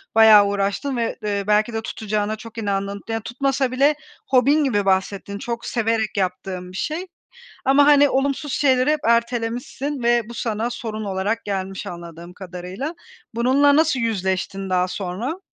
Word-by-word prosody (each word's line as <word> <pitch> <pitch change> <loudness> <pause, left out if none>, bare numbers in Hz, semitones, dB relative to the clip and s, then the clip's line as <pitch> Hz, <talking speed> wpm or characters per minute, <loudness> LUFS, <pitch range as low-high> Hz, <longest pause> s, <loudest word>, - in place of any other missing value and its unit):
bayağı 220 -2 +8
uğraştığın 200 +7 -1
ve, 230 -1 -1
eee, 205 -1 -1
belki 210 +2 +2
de 225 - -2
tutacağına 215 -1 -2
çok 225 +1 -12
inandığın 200 -1 -2
Yani, 225 0 -2
tutmasa 265 +2 -1
bile 280 +4 +3 0.3
hobin 275 +4 +4
gibi 205 -8 +1
bahsettin, 195 +1 0
çok 235 +2 -4
severek 225 -2 -1
yaptığın 180 -1 -3
bir 185 - -8
şey. 330 - -3 0.6
Ama, 280 +2 +5
hani, 290 -1 +6
olumsuz 275 +1 -1
şeyleri 260 -1 +3
hep 305 0 +1
ertelemişsin 240 +4 -1
ve 240 0 +3
bu 235 - -8
sana 225 0 -2
sorun 220 -2 -5
olarak 200 +3 -2
gelmiş 195 -1 -4
anladığım 170 0 -9
kadarıyla. 185 - -6 0.4
Bununla 270 +5 +4
nasıl 310 -4 +3
yüzleştin 195 -3 -2
daha 180 0 +2
sonra? 205 - -4
225 Hz, 150 wpm, -22 LUFS, 195-260 Hz, 0.6 s, bayağı